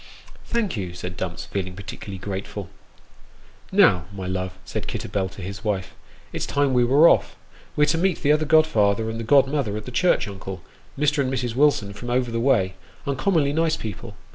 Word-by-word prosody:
" -, -, -21 dB
Thank 230 Hz, -, 0 dB
you," 90 Hz, -4 st, -4 dB
said 90 Hz, 0 st, -6 dB
Dumps, 90 Hz, -1 st, -4 dB
feeling 95 Hz, -2 st, -4 dB
particularly 100 Hz, 0 st, -8 dB
grateful. 95 Hz, 0 st, -5 dB, 0.5 s
" -, -, -28 dB, 0.3 s
Now, 90 Hz, -2 st, +5 dB
my 95 Hz, -2 st, -6 dB
love," 95 Hz, 0 st, -3 dB
said -, -, -4 dB
Kitterbell 95 Hz, -2 st, -2 dB
to 95 Hz, -, -9 dB
his 95 Hz, +1 st, -7 dB
wife, 100 Hz, -3 st, -2 dB, 0.2 s
" -, -, -27 dB
it's -, -, -3 dB
time 140 Hz, -2 st, +1 dB
we 125 Hz, -1 st, +4 dB
were 140 Hz, +7 st, +6 dB
off. -, -, +3 dB, 0.4 s
We're 150 Hz, -, +4 dB
to 165 Hz, -, +1 dB
meet 185 Hz, -1 st, 0 dB
the 145 Hz, -, +4 dB
other 155 Hz, +1 st, +3 dB
godfather 110 Hz, -9 st, +3 dB
and 115 Hz, -, -5 dB
the -, -, -3 dB
godmother 135 Hz, -3 st, +3 dB
at 110 Hz, -, -7 dB
the 125 Hz, -, -7 dB
church, 180 Hz, -, +2 dB
uncle, 95 Hz, -2 st, -7 dB, 0.3 s
Mr. 150 Hz, +1 st, +2 dB
and 130 Hz, -2 st, +1 dB
Mrs. 125 Hz, -3 st, -2 dB
Wilson 130 Hz, -7 st, +2 dB
from 120 Hz, +4 st, -7 dB
over 125 Hz, -1 st, 0 dB
the 115 Hz, -, -1 dB
way 115 Hz, -7 st, +2 dB, 0.3 s
uncommonly 140 Hz, +1 st, +1 dB
nice 160 Hz, 0 st, +1 dB
people. 110 Hz, -, -7 dB
115 Hz, 195 wpm, -23 LUFS, 95-145 Hz, 0.5 s, were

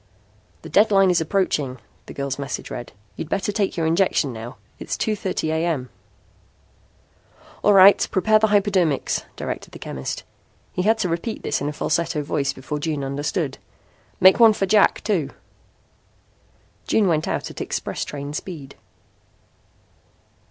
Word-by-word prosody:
"The -, -, -8 dB
deadline 195 Hz, -3 st, +4 dB
is 175 Hz, -, +2 dB
approaching," 155 Hz, -7 st, 0 dB, 0.3 s
the -, -, -8 dB
girl's 140 Hz, 0 st, -3 dB
message 140 Hz, -2 st, -5 dB
read. 120 Hz, -, -6 dB, 0.2 s
"You'd 160 Hz, -, -6 dB
better 195 Hz, +2 st, -1 dB
take 200 Hz, -3 st, -1 dB
your 165 Hz, -, 0 dB
injection 165 Hz, -5 st, +1 dB
now. 115 Hz, 0 st, -8 dB, 0.2 s
It -, -, -9 dB
is -, -, -1 dB
2:30 195 Hz, -6 st, -2 dB
A.M." 160 Hz, -6 st, -1 dB, 1.7 s
"All 205 Hz, -, +4 dB
right, 195 Hz, +1 st, +7 dB
prepare 215 Hz, +4 st, +3 dB
the 220 Hz, -, +3 dB
hypodermics," 195 Hz, -7 st, +1 dB
directed -, -, -6 dB
the -, -, -8 dB
chemist. 65 Hz, 0 st, -5 dB, 0.5 s
He -, -, -1 dB
had 220 Hz, +4 st, +3 dB
to 215 Hz, -, 0 dB
repeat 175 Hz, +7 st, -3 dB
this -, -, -1 dB
in 145 Hz, -, -1 dB
a -, -, -3 dB
falsetto 155 Hz, 0 st, -1 dB
voice 145 Hz, -1 st, -1 dB
before 150 Hz, +3 st, -5 dB
June 150 Hz, -2 st, -2 dB
understood. 140 Hz, +2 st, -2 dB, 0.6 s
"Make 190 Hz, +4 st, +7 dB
one 225 Hz, -2 st, +8 dB
for 200 Hz, -, -1 dB
Jack 205 Hz, +1 st, +3 dB
too." 190 Hz, -9 st, 0 dB, 1.6 s
June 210 Hz, -3 st, +3 dB
went 155 Hz, -3 st, +1 dB
out -, -, -3 dB
at -, -, -8 dB
express -, -, -3 dB
train 145 Hz, 0 st, -6 dB
speed. 150 Hz, -4 st, -7 dB
165 Hz, 145 wpm, -22 LUFS, 145-195 Hz, 1.7 s, one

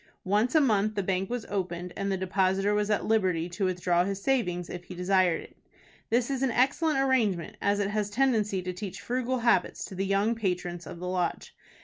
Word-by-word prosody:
Once 210 Hz, -, +1 dB
a -, -, +8 dB
month 215 Hz, -5 st, +2 dB
the 200 Hz, -, 0 dB
bank 190 Hz, 0 st, -1 dB
was 245 Hz, -2 st, -3 dB
opened, 180 Hz, -2 st, -3 dB
and 195 Hz, 0 st, -2 dB
the 190 Hz, -, 0 dB
depositor 190 Hz, +2 st, +1 dB
was 210 Hz, 0 st, 0 dB
at 210 Hz, -, +1 dB
liberty 185 Hz, -7 st, +1 dB
to 180 Hz, +3 st, -2 dB
withdraw 180 Hz, -1 st, +1 dB
his 195 Hz, +1 st, -3 dB
savings 185 Hz, -8 st, 0 dB
if 175 Hz, 0 st, -7 dB
he 180 Hz, -, -9 dB
desired 180 Hz, -1 st, +2 dB
it. -, -, -16 dB, 0.5 s
This 240 Hz, +3 st, +1 dB
is 265 Hz, -1 st, -2 dB
an 270 Hz, -, +2 dB
excellent 275 Hz, +5 st, +2 dB
arrangement, 235 Hz, -11 st, +1 dB
as 205 Hz, 0 st, +1 dB
it 200 Hz, 0 st, 0 dB
has 210 Hz, -1 st, -1 dB
a -, -, -15 dB
tendency 215 Hz, -7 st, +1 dB
to 180 Hz, 0 st, -3 dB
teach 190 Hz, +1 st, -6 dB
frugal 255 Hz, +1 st, -1 dB
habits 235 Hz, -6 st, +1 dB
to -, -, -10 dB
the 190 Hz, +1 st, -2 dB
young 200 Hz, +3 st, +2 dB
patrons 180 Hz, -5 st, -3 dB
of -, -, -8 dB
the 180 Hz, +1 st, -5 dB
Lodge. 180 Hz, -1 st, -2 dB
195 Hz, 215 wpm, -28 LUFS, 180-225 Hz, 0.5 s, a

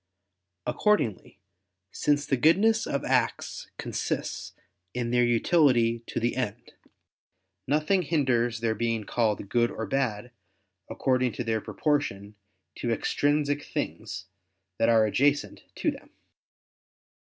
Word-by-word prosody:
Accordingly, 210 Hz, -, 0 dB, 0.5 s
since 145 Hz, -1 st, +1 dB
the 135 Hz, -, +1 dB
goodness 200 Hz, -, +3 dB
of 140 Hz, -, -2 dB
acts -, -, -1 dB
consists -, -, -3 dB, 0.4 s
in 120 Hz, -1 st, -2 dB
their 120 Hz, 0 st, +4 dB
utility 120 Hz, -1 st, +3 dB
to -, -, -2 dB
the 120 Hz, +1 st, 0 dB
end, 120 Hz, -3 st, -4 dB, 1.0 s
nothing 155 Hz, +7 st, +2 dB
hinders 125 Hz, -8 st, +1 dB
their 115 Hz, -1 st, +1 dB
being 115 Hz, 0 st, -1 dB
called 105 Hz, -2 st, 0 dB
good 120 Hz, +3 st, +2 dB
or 110 Hz, -, -4 dB
bad 125 Hz, -4 st, -1 dB, 0.6 s
according 130 Hz, -2 st, +1 dB
to 125 Hz, -, -3 dB
their 110 Hz, -1 st, -1 dB
proportion 110 Hz, -11 st, -1 dB, 0.4 s
to 120 Hz, -, -3 dB
extrinsic 145 Hz, +4 st, +1 dB
things -, -, -5 dB, 0.5 s
that 115 Hz, -, +3 dB
are 110 Hz, -1 st, +5 dB
adjacent 140 Hz, +7 st, +1 dB
to -, -, 0 dB
them. -, -, -12 dB
125 Hz, 115 wpm, -27 LUFS, 115-145 Hz, 1.0 s, are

